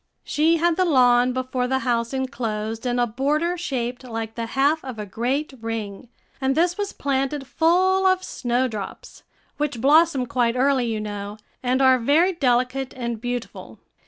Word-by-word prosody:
She 320 +3 +2
had 340 0 +1
the 370 - +3
lawn 250 -6 +4
before 255 0 -2
the 265 +1 +1
house 235 -2 0
enclosed 225 -4 -3
in 245 0 0
a 245 - +3
border 295 +9 0
shaped 255 -8 -3
like 225 -2 -5
the 230 0 -4
half 285 +6 +1
of 255 -4 -7
a 210 - -5
great 255 +9 -2
ring, 225 0 -5 0.3
and 265 0 +1
this 345 +2 +2
was 405 0 -3
planted 275 0 -2
full 370 +6 +2
of 370 0 +2
snowdrops, 245 - -3 0.4
which 290 -5 -2
blossom 285 0 +4
quite 245 -2 0
early, 260 -1 +2
you 220 -2 -2
know, 205 0 -6 0.2
and 255 +1 +1
are 260 -1 +5
very 315 +10 +3
delicate 255 -2 0
and 235 -3 -4
beautiful. 245 -1 -5
255 Hz, 160 wpm, -23 LUFS, 235-295 Hz, 0.4 s, are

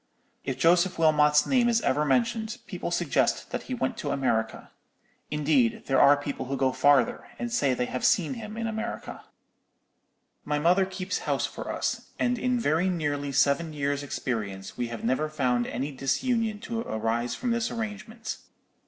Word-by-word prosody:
If 135 -2 -3
Joseph 175 +5 +3
Wilmot's 150 -2 +4
name 245 -3 +3
is 230 -1 +3
ever 145 +3 +1
mentioned, 225 - 0
people - - -5
suggest - - 0
that - - -2
he 255 - -1
went 245 -1 -2
to 235 - -4
America; 115 -5 -1 0.6
indeed, 145 -6 +1
there 135 -1 +3
are 145 +1 +7
people 140 -2 -5
who 135 +1 -2
go 130 0 +2
farther, 140 -3 +3
and 240 -1 -4
say 140 - +2
they 125 - 0
have 130 - -4
seen 180 +2 +3
him 220 -3 -7
in 230 - -2
America. 225 +1 -5 1.2
"My 150 0 -1
mother 180 +5 +3
keeps 185 0 -3
house - - +1
for - - -6
us; - - -2
and 245 -1 0
in 250 +1 +1
very 170 -2 +1
nearly 145 -5 -1
seven 140 +4 +2
years' 145 -1 -1
experience 105 -8 -4
we 120 -1 -2
have 115 -1 -7
never 130 +6 0
found 125 -5 0
any 135 +4 -3
disunion 220 - 0
to 230 0 -4
arise 115 - -2
from 245 -1 -2
this 235 -1 0
arrangement. 220 0 -5
150 Hz, 170 wpm, -27 LUFS, 135-220 Hz, 1.2 s, are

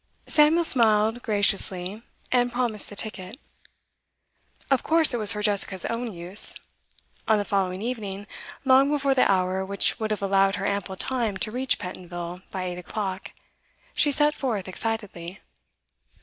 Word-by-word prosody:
Samuel 315 +2 +3
smiled 225 -4 +3
graciously, 200 -2 0 0.3
and 245 -1 +2
promised 235 -4 -2
the 205 - -10
ticket. 205 +2 -3 1.3
Of 270 - +3
course 320 -3 +4
it - - 0
was 215 -3 +5
for 210 0 -5
Jessica's 200 -3 +1
own 230 0 -3
use. 180 +2 +4 0.7
On 220 - +3
the 205 - -2
following 190 -1 -2
evening, 205 -5 -5 0.4
long 265 +1 +5
before 280 -2 +1
the 255 - +3
hour 185 0 0
which 200 +1 0
would 220 -1 -2
have 210 -2 -3
allowed 195 0 +2
her - - -4
ample 200 -1 -3
time 230 -2 -2
to 215 - -3
reach 260 +3 +1
Pentonville 180 -2 -8
by 185 - -5
eight 180 -1 -5
o'clock, 190 +1 -6 0.6
she 295 - +2
set 295 +1 +3
forth 225 -11 -3
excitedly. 195 -3 -5
210 Hz, 150 wpm, -24 LUFS, 190-245 Hz, 1.3 s, was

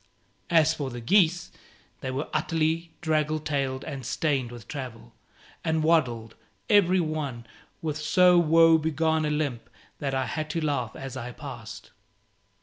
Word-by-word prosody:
As 160 -2 +4
for 145 -4 -4
the 120 -1 -7
geese, 175 - +2 0.5
they 130 - -4
were 135 +3 -3
utterly 165 +1 0
draggle 155 -2 +1
tailed 140 -3 -2
and 140 -4 -6
stained 135 -6 -1
with 120 -2 -11
travel, 125 - -7 0.5
and 160 -1 0
waddled, 125 -9 +1 0.4
every 190 -3 +5
one, 150 -8 -3 0.4
with 155 -2 -2
so 180 +4 +5
woe 165 0 +5
begone 160 0 +1
a - - 0
limp 145 -6 -2 0.3
that 135 -2 -2
I 130 -1 0
had 155 +3 -4
to 160 +1 -2
laugh 125 -7 -1
as 135 -1 -7
I 125 -1 -6
passed. 115 -8 -9
150 Hz, 145 wpm, -26 LUFS, 130-160 Hz, 0.5 s, every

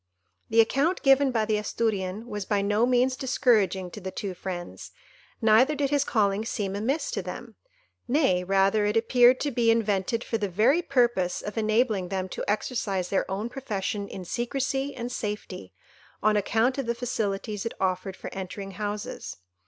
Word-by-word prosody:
The 225 +1 +6
account 285 +10 +1
given 270 0 +5
by 225 -4 +1
the 215 -1 +1
Asturian 210 -1 -2
was 210 -4 -4
by 200 0 0
no 210 +4 +2
means 255 +1 +2
discouraging 215 -8 +1
to 210 - -9
the 190 - -4
two 190 0 -5
friends, 175 -1 -6 0.5
neither 230 +7 +5
did 280 -1 -1
his 285 -1 +3
calling 210 -5 +1
seem 205 -4 -3
amiss 275 - -1
to - - -2
them; - - -8 0.5
nay, 240 - +2
rather, 195 +3 +2
it 210 +2 +1
appeared 245 +2 +5
to 290 - 0
be 235 -2 +2
invented 225 0 +1
for 225 - -2
the 205 -2 -1
very 230 - +3
purpose 240 - +1
of 210 - -5
enabling 215 -3 +1
them 190 0 -3
to - - -5
exercise 205 -4 -1
their 195 - 0
own 200 +4 -2
profession 210 -5 -3
in 185 -2 -8
secresy 270 +5 -2
and 240 +1 -5
safety, 210 -3 -5 0.5
on 215 0 +4
account 225 +6 +1
of 265 - -3
the 235 - 0
facilities 215 -4 -2
it 230 - -4
offered 185 0 -1
for - - -8
entering 195 +1 -6
houses. 205 +2 -5
215 Hz, 170 wpm, -26 LUFS, 195-245 Hz, 0.5 s, The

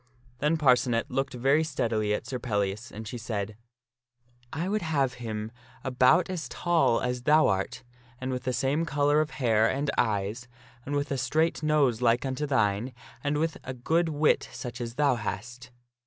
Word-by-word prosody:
Then 150 +3 +2
Parcenet 125 -5 +2
looked 135 -1 -1
very 135 +6 +3
steadily 110 -8 -1
at 105 - -1
Sir 130 -2 -4
Pellias, 105 -2 -2
and 110 +1 -8
she 120 +2 -6
said, 105 -2 -4 0.5
" 120 0 -39
I 165 +3 -2
would 210 +2 0
have 140 -6 0
him 110 -1 -4 0.3
about 130 +5 +4
as 180 -3 -4
tall 170 -9 +2
as 125 0 -2
thou 155 +4 +5
art, 95 +5 -1 0.4
and 130 +1 -3
with 125 0 -2
the 130 - +1
same 135 +5 0
color 145 -1 +2
of 155 - -2
hair 115 -5 +2
and 140 +1 -1
eyes, 110 +1 -1 0.4
and 145 - -2
with 145 0 -1
a 135 - 0
straight 155 +7 +1
nose 145 -6 +2
like 120 +1 +3
unto 135 +3 -2
thine, 115 -1 +1 0.3
and 145 +1 0
with 160 +1 -1
a 130 - -6
good 160 +7 +1
wit 150 0 +2
such 120 -1 -7
as 120 0 -5
thou 145 -1 +3
hast." 120 +3 -6
130 Hz, 180 wpm, -28 LUFS, 115-150 Hz, 0.5 s, thou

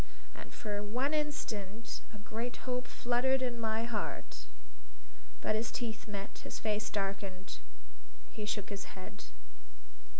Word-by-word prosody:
And - - -7
for 205 -2 -1
one 250 +8 +2
instant 230 -8 0
a 215 - -7
great 225 +3 -2
hope 250 -1 +2
fluttered 260 +2 +4
in 240 -2 +1
my 220 0 +3
heart. 205 - -1 0.9
But 215 - +4
his 225 +2 +2
teeth 225 -3 -1
met. 200 -1 -3
His - - -3
face 215 -1 +2
darkened. 195 -2 -1 0.7
He 215 - -2
shook 205 -1 +1
his 200 -1 -4
head. 185 - -6
220 Hz, 130 wpm, -36 LUFS, 205-240 Hz, 0.9 s, fluttered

